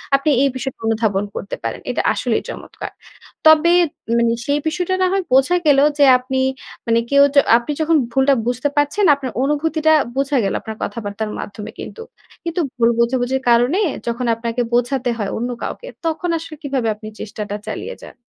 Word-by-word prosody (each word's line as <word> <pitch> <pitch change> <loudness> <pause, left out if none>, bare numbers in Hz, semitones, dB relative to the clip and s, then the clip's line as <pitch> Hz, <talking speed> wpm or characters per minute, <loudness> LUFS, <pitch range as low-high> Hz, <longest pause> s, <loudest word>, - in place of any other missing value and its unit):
আপনি 275 +2 +1
এই 275 - +3
বিষয়টা 265 0 -5
অনুধাবন 215 -3 +1
করতে 200 - -5
পারেন। - - -4
এটা - - 0
আসলেই - - -1
চমৎকার। - - -8 0.6
তবে 315 +2 +6 0.4
মানে 235 0 +2
সেই 285 +1 +1
বিষয়টা 360 +3 -1
না 370 - +4
হয় 390 -1 +1
বোঝা 270 +7 +4
গেলো 280 -2 +5 0.2
যে 285 - +7
আপনি 260 +1 -3 0.5
মানে 230 0 +3
কেউ 280 0 +6
য - - +3 0.2
আপনি 240 +4 -4
যখন 320 +1 +3
ভুলটা 270 +2 +3
বুঝতে 250 +4 0
পারছেন, 290 +8 +2
আপনার 270 -3 -5
অনুভূতিটা 315 +2 +1 0.2
বোঝা 275 0 +1
গেল 195 - -1
আপনার 220 -1 -7
কথাবার্তার 210 0 -4
মাধ্যমে 205 +1 -7
কিন্তু। 455 - -8 0.4
কিন্তু 335 +1 -3 0.2
ভুল 230 -1 +4
বোঝাবুঝির 250 +2 +1
কারণে 245 - +3 0.3
যখন 235 +2 -2
আপনাকে 230 +1 -3
বোঝাতে 245 +1 +1
হয় 205 -3 -3
অন্য 240 +2 -2
কাউকে, - - -6 0.2
তখন 330 +2 -1
আসলে 325 -1 -8
কিভাবে 270 -5 -1
আপনি 215 +1 -10
চেষ্টাটা 205 -1 -5
চালিয়ে - - -5
যান? - - -12
265 Hz, 170 wpm, -19 LUFS, 230-305 Hz, 0.6 s, যে